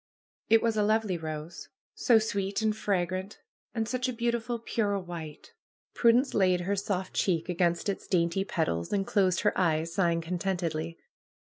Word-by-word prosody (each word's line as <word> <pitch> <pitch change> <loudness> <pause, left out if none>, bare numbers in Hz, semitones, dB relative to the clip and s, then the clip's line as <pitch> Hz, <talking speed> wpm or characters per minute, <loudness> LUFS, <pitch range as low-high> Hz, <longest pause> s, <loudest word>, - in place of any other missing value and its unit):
It 225 +1 +5
was 225 -2 +1
a - - +3
lovely 215 -2 +1
rose. 155 -1 -6 0.2
So 240 -3 +4
sweet 200 -1 -1
and 215 -1 +2
fragrant! 190 -1 -2 0.4
And 225 -1 -1
such 255 +1 -1
a - - -2
beautiful 235 0 -1
pure 215 -3 -1
white! 170 -5 -8 0.4
Prudence 245 +3 +3
laid 185 -3 +3
her 195 +3 0
soft 190 -2 -2
cheek 170 -3 0
against 175 0 +1
its 200 - -3
dainty 170 +1 +1
petals, 160 - -2
and 195 -1 +1
closed 185 -4 +2
her 210 - +2
eyes, 165 -2 +1
sighing 170 -2 +2
contentedly. 170 -2 -2
190 Hz, 155 wpm, -29 LUFS, 170-215 Hz, 0.4 s, It